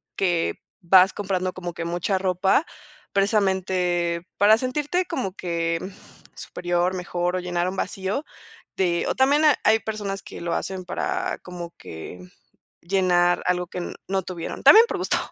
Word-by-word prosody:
que 175 Hz, -4 st, 0 dB, 0.3 s
vas 185 Hz, +1 st, +6 dB
comprando 185 Hz, -2 st, -2 dB
como 175 Hz, -2 st, -6 dB
que 170 Hz, -, -4 dB
mucha 175 Hz, +3 st, -1 dB
ropa, 190 Hz, -, +2 dB, 0.5 s
precisamente, 185 Hz, -4 st, +1 dB
para 210 Hz, +2 st, +6 dB
sentirte 295 Hz, +9 st, -1 dB
como 195 Hz, -, -3 dB
que, 170 Hz, -3 st, -2 dB
mm, 185 Hz, -, -6 dB, 0.5 s
superior, 175 Hz, +1 st, -1 dB
mejor 180 Hz, 0 st, -2 dB
o -, -, 0 dB
llenar 175 Hz, 0 st, -1 dB
un 190 Hz, -, -6 dB
vacío, 195 Hz, +9 st, -3 dB, 0.5 s
te 175 Hz, -2 st, 0 dB
o -, -, 0 dB
también 285 Hz, +4 st, +3 dB
ha 295 Hz, -, +5 dB
hay 220 Hz, +1 st, +5 dB
personas 205 Hz, -2 st, -4 dB
que -, -, -10 dB
lo 170 Hz, -, -2 dB
hacen 190 Hz, -1 st, -4 dB
para -, -, -2 dB
como 175 Hz, -1 st, -8 dB
que 80 Hz, +2 st, -9 dB, 0.6 s
llenar 175 Hz, -1 st, +2 dB
algo 180 Hz, 0 st, 0 dB
que 180 Hz, -, -6 dB
n 175 Hz, -, -5 dB
no 190 Hz, 0 st, 0 dB
tuvieron, 175 Hz, -2 st, -6 dB
también 450 Hz, +2 st, +9 dB
por -, -, -3 dB
gusto. -, -, 0 dB
185 Hz, 155 wpm, -24 LUFS, 175-195 Hz, 0.6 s, también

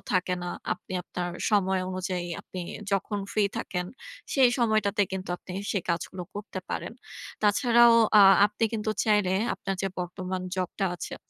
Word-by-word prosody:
থাকে 180 Hz, 0 st, +1 dB
না। 175 Hz, -, -3 dB, 0.2 s
আপনি -, -, -13 dB
আপনার 175 Hz, 0 st, -4 dB, 0.2 s
সময় 190 Hz, -3 st, +2 dB
অনুযায়ী 185 Hz, -1 st, -3 dB
আপনি 185 Hz, -, -8 dB, 0.3 s
যখন 200 Hz, +2 st, 0 dB
free 205 Hz, -2 st, +2 dB
থাকেন। 180 Hz, -1 st, -3 dB, 0.5 s
সেই 260 Hz, -3 st, +6 dB
সময়টাতে 215 Hz, -3 st, +2 dB
কিন্তু 190 Hz, 0 st, -4 dB
আপনি 180 Hz, -, -10 dB, 0.2 s
সে 200 Hz, -, +1 dB
কাজগুলো 180 Hz, +2 st, -3 dB
করতে 205 Hz, -2 st, -6 dB
পারেন। -, -, -3 dB, 0.5 s
তাছাড়াও, 235 Hz, +3 st, +5 dB, 0.3 s
আ -, -, +9 dB, 0.3 s
আপনি 210 Hz, +2 st, -2 dB
কিন্তু 215 Hz, -1 st, -1 dB
চাইলে 210 Hz, -4 st, +3 dB, 0.2 s
আপনার 195 Hz, 0 st, -4 dB
যে 195 Hz, -, +1 dB
বর্তমান 185 Hz, +1 st, -4 dB
job 185 Hz, -2 st, -1 dB
টা 195 Hz, -, +1 dB
আছে -, -, -6 dB
190 Hz, 155 wpm, -27 LUFS, 185-210 Hz, 0.5 s, আ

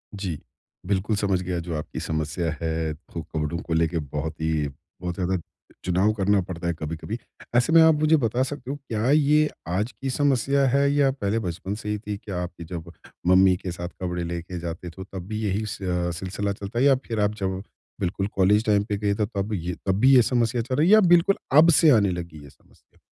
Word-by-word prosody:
जी। 90 Hz, -7 st, -4 dB, 0.5 s
बिल्कुल, 100 Hz, +2 st, 0 dB
समझ 100 Hz, -3 st, 0 dB
गया 90 Hz, -1 st, -2 dB
जो 85 Hz, -1 st, -4 dB
आपकी 75 Hz, -, -6 dB
समस्या 80 Hz, +1 st, -2 dB
है 80 Hz, -1 st, -1 dB
तो 80 Hz, +1 st, -9 dB
कपड़ों 80 Hz, +1 st, -3 dB
को 80 Hz, -, -4 dB
लेके 80 Hz, +1 st, +1 dB
बहुत 75 Hz, +2 st, -5 dB
ही 80 Hz, -2 st, 0 dB, 0.3 s
बहुत 90 Hz, -1 st, -3 dB
ज़्यादा 95 Hz, -1 st, 0 dB, 0.5 s
चुनाव 95 Hz, +4 st, +2 dB
करना 100 Hz, -1 st, +2 dB
पड़ता 85 Hz, -1 st, -5 dB
है 85 Hz, -, +1 dB
कभी-कभी। 80 Hz, +7 st, -5 dB, 0.4 s
ऐसे 125 Hz, +7 st, +3 dB
में 165 Hz, -, +8 dB
आप 160 Hz, 0 st, +7 dB
मुझे 155 Hz, +1 st, +4 dB
बता 120 Hz, 0 st, +1 dB
सकते 135 Hz, -1 st, -5 dB
हो -, -, -3 dB
क्या 120 Hz, -4 st, -2 dB
ये 150 Hz, 0 st, +4 dB, 0.2 s
आज 100 Hz, +7 st, -1 dB
की 135 Hz, -, -5 dB
समस्या 140 Hz, 0 st, +2 dB
है 140 Hz, +2 st, +3 dB
या 140 Hz, -2 st, +3 dB
पहले 110 Hz, -4 st, -1 dB
बचपन 95 Hz, +1 st, -4 dB
से 105 Hz, -1 st, -6 dB
ही 105 Hz, -, 0 dB
थी? 105 Hz, -1 st, -5 dB
क्या 95 Hz, -4 st, -5 dB
आपकी 85 Hz, -1 st, -8 dB
जब 85 Hz, 0 st, -7 dB, 0.4 s
मम्मी 95 Hz, 0 st, +6 dB
के 90 Hz, -, -5 dB
साथ 85 Hz, 0 st, -5 dB
कपड़े 90 Hz, -1 st, -2 dB
लेके 85 Hz, +1 st, -5 dB
जाते 85 Hz, +1 st, -6 dB
तो 95 Hz, +3 st, -9 dB
तब 95 Hz, -1 st, -8 dB
भी 110 Hz, 0 st, -4 dB
यही 105 Hz, +1 st, -1 dB
स 95 Hz, -1 st, -6 dB
अ, 90 Hz, -2 st, -1 dB
सिलसिला 95 Hz, +4 st, -3 dB
चलता 100 Hz, +4 st, -5 dB
है 135 Hz, -, +4 dB
या 135 Hz, -2 st, +6 dB
फिर 115 Hz, -2 st, -2 dB
आप 105 Hz, +1 st, +1 dB
जब 95 Hz, 0 st, -2 dB, 0.4 s
बिल्कुल 95 Hz, +1 st, -1 dB
कॉलेज 105 Hz, +3 st, +3 dB
टाइम 105 Hz, -1 st, +3 dB
पे 105 Hz, -, 0 dB
गए 100 Hz, -1 st, 0 dB
तब 100 Hz, 0 st, -3 dB
ये 90 Hz, -2 st, -3 dB
तब 95 Hz, -1 st, +2 dB
भी 135 Hz, +3 st, +6 dB
ये 125 Hz, -, +8 dB
समस्या 120 Hz, 0 st, +1 dB
चल 130 Hz, +2 st, -3 dB
रही 155 Hz, +4 st, +3 dB
है 210 Hz, -, +6 dB
या 215 Hz, -, +9 dB
बिल्कुल 175 Hz, +3 st, +5 dB, 0.2 s
अब 165 Hz, +2 st, +8 dB
से 160 Hz, -, +6 dB
आने 105 Hz, -7 st, +5 dB
लगी 85 Hz, -4 st, -6 dB
ये 70 Hz, -, -12 dB
समस्या? -, -, -27 dB
95 Hz, 220 wpm, -25 LUFS, 85-115 Hz, 0.5 s, या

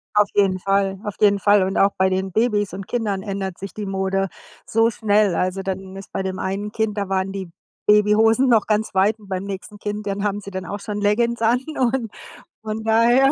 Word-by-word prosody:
Auf 210 Hz, -1 st, +4 dB
jeden 195 Hz, -2 st, +3 dB
Fall, 195 Hz, 0 st, 0 dB
auf 210 Hz, -, -4 dB
jeden 200 Hz, -1 st, +5 dB
Fall. 205 Hz, 0 st, +4 dB
Und 190 Hz, +1 st, -1 dB
auch 195 Hz, +1 st, +3 dB
bei 190 Hz, 0 st, +3 dB
den 190 Hz, 0 st, -2 dB
Babys 210 Hz, -3 st, +1 dB
und 195 Hz, 0 st, -7 dB
Kindern 210 Hz, -5 st, -1 dB
ändert 195 Hz, -3 st, -4 dB
sich 195 Hz, +1 st, -7 dB
die 210 Hz, -2 st, -5 dB
Mode 195 Hz, 0 st, -1 dB, 0.4 s
so 225 Hz, +1 st, +3 dB
schnell. 210 Hz, -4 st, +2 dB
Also 185 Hz, +2 st, -1 dB
dann 190 Hz, 0 st, -5 dB
ist 195 Hz, -, -10 dB
bei 195 Hz, -, -2 dB
dem 190 Hz, 0 st, -4 dB
einen 200 Hz, +2 st, -3 dB
Kind 220 Hz, -2 st, -1 dB
da 200 Hz, -1 st, -2 dB
waren 190 Hz, 0 st, -1 dB
die 190 Hz, -3 st, -6 dB, 0.4 s
Babyhosen 215 Hz, +4 st, +4 dB
noch 225 Hz, -4 st, +4 dB
ganz 215 Hz, 0 st, 0 dB
weit 200 Hz, +4 st, +3 dB
und 205 Hz, -2 st, -17 dB
beim 190 Hz, 0 st, -3 dB
nächsten 200 Hz, +1 st, -7 dB
Kind, 210 Hz, 0 st, -5 dB
dann 200 Hz, 0 st, -2 dB
haben 205 Hz, 0 st, -1 dB
sie 200 Hz, -, -9 dB
dann 185 Hz, -2 st, -5 dB
auch 205 Hz, +2 st, -5 dB
schon 210 Hz, 0 st, -4 dB
Leggins 235 Hz, +3 st, +1 dB
an. 235 Hz, +2 st, +3 dB, 0.2 s
Und 245 Hz, -3 st, 0 dB, 0.5 s
von 220 Hz, 0 st, -4 dB
daher 240 Hz, +5 st, +4 dB
205 Hz, 215 wpm, -21 LUFS, 195-215 Hz, 0.5 s, jeden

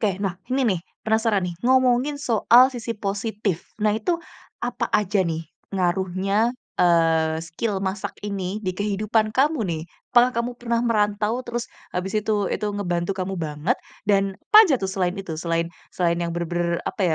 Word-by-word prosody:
Ke. 200 Hz, -4 st, +1 dB
Nah, 190 Hz, -3 st, -1 dB, 0.2 s
ini 270 Hz, -, +2 dB, 0.2 s
nih, -, -, -6 dB, 0.2 s
penasaran 220 Hz, -3 st, +2 dB
nih, 175 Hz, -, -5 dB
ngomongin 260 Hz, +2 st, +3 dB
soal 245 Hz, -1 st, +5 dB
sisi 235 Hz, -2 st, -4 dB
positif. 205 Hz, -2 st, -3 dB
Nah 210 Hz, 0 st, +3 dB
itu, 335 Hz, +10 st, -1 dB, 0.4 s
apa -, -, -2 dB
aja 205 Hz, -1 st, +2 dB
nih, 165 Hz, -2 st, -3 dB, 0.2 s
ngaruhnya, 190 Hz, +4 st, +1 dB, 0.2 s
eee, 165 Hz, -2 st, +3 dB
skill 190 Hz, +5 st, -3 dB
masak 190 Hz, +1 st, -3 dB
ini, 200 Hz, 0 st, -3 dB
di 185 Hz, -3 st, -3 dB
kehidupan 215 Hz, +2 st, 0 dB
kamu, 280 Hz, +2 st, +2 dB
nih? 165 Hz, -4 st, -2 dB, 0.3 s
Pakah 245 Hz, +1 st, +6 dB
kamu 235 Hz, +1 st, -1 dB
pernah 235 Hz, -1 st, 0 dB
merantau 210 Hz, 0 st, +1 dB
terus 240 Hz, 0 st, -3 dB, 0.3 s
habis 185 Hz, +2 st, -3 dB
itu, 210 Hz, -1 st, +1 dB
itu 210 Hz, -, -1 dB
ngebantu 180 Hz, -3 st, -1 dB
kamu 190 Hz, 0 st, -2 dB
banget? 150 Hz, -1 st, -1 dB, 0.3 s
Dan 195 Hz, -1 st, +2 dB, 0.2 s
pa 435 Hz, +1 st, +11 dB
aja 275 Hz, -, +4 dB
tuh, 190 Hz, -, -1 dB
selain 185 Hz, -1 st, -1 dB
itu, 195 Hz, -4 st, -5 dB
selain 165 Hz, -1 st, 0 dB, 0.2 s
selain 170 Hz, -2 st, +1 dB
yang 170 Hz, -1 st, -2 dB
bener-bener, 170 Hz, 0 st, -1 dB
apa -, -, -3 dB
200 Hz, 160 wpm, -23 LUFS, 180-225 Hz, 0.4 s, pa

